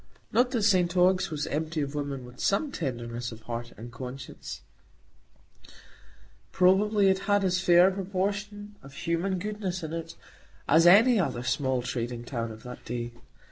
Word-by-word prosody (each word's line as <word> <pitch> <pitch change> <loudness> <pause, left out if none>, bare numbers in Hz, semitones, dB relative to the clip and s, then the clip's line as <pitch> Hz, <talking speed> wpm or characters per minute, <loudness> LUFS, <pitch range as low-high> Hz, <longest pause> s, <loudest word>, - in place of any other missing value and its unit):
Not 245 +2 +3
that 240 -4 -1
St 185 -3 +3
Ogg's 185 +1 +3
was 150 -2 -3
empty 160 +1 -2
of 140 -1 -2
women 140 -3 -4
with 125 0 -14
some 275 +9 +1
tenderness 120 - -4
of 110 0 -10
heart 120 +1 -5
and 120 +3 -9
conscience; 130 +3 -8 1.9
probably 200 +2 +4
it 190 0 +2
had 205 0 +3
as 180 -1 +1
fair 175 0 +6
a - - -3
proportion 205 +2 -3
of 135 0 -13
human 170 +5 -1
goodness 190 -2 -4
in 160 0 -5
it 165 0 -5 0.5
as 165 +2 +5
any 220 +6 +7
other 125 -9 -1
small 130 0 0
trading 120 -1 -4
town 115 -3 -4
of 110 0 -11
that 125 0 -9
day. 120 0 -4
165 Hz, 160 wpm, -28 LUFS, 125-195 Hz, 1.9 s, any